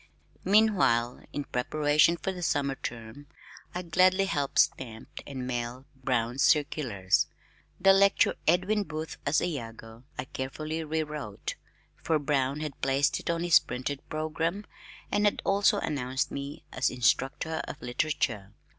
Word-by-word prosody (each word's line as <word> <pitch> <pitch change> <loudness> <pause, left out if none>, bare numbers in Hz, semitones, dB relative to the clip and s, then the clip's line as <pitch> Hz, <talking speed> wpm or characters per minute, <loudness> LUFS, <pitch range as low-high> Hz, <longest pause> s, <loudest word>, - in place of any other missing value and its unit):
Meanwhile, 190 - +3
in 145 - -3
preparation 150 +6 +2
for 190 - -2
the 180 -1 -7
summer 140 -4 +1
term 120 +2 -7 0.5
I 180 - -2
gladly 185 +3 +4
helped 145 -7 -2
stamp 110 -2 +1 0.2
and 130 -3 -5
mail 125 +1 -4
Brown's 125 -1 -1
circulars. 140 - +2 0.5
The 195 +1 +6
lecture 200 +1 +4
"Edwin 185 +6 +3
Booth 160 -3 -5
as 150 +2 +2
Iago" 115 -6 -6
I 125 - -3
carefully 155 +5 -4
re 160 +1 -1
wrote 150 -9 -5 0.4
for 160 - +1
Brown 140 -1 0
had 150 -3 -6
placed 135 +1 +2
it - - -6
on 170 0 0
his 175 -1 +7
printed 135 +3 -4
programme 160 +5 -2 0.5
and 205 0 +2
had 205 - +2
also 200 +1 +3
announced 130 -7 -2
me 140 +1 -6
as - - +1
"Instructor 135 +5 0
in - - -5
Literature." 120 -6 -2
145 Hz, 135 wpm, -28 LUFS, 125-165 Hz, 0.5 s, his